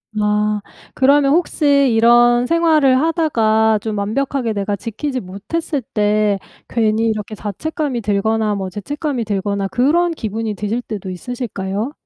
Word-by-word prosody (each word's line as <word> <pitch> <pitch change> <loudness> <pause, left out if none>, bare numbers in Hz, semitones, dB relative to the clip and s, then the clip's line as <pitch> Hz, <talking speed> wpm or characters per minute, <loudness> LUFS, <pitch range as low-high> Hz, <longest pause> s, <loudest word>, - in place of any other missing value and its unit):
아 210 0 +1 0.3
그러면 280 +1 +4
혹시 340 -2 0 0.3
이런 240 +1 +5
생활을 310 -6 +3
하다가 220 -10 +2
좀 215 -2 -3
완벽하게 235 +3 -1
내가 200 0 -2
지키지 255 +5 -4
못했을 255 - -4
때 210 -2 +1 0.3
괜히 225 -1 +1
이렇게 215 -1 -3
자책감이 260 - -3
들거나 210 +1 0
뭐 190 -1 -4
죄책감이 265 - -3
들거나 200 -1 -1
그런 320 - +2
기분이 220 -6 -4
드실 210 +5 -2
때도 205 -5 -6
있으실까요? 205 +1 -4
225 Hz, 310 characters per minute, -18 LUFS, 210-270 Hz, 0.3 s, 이런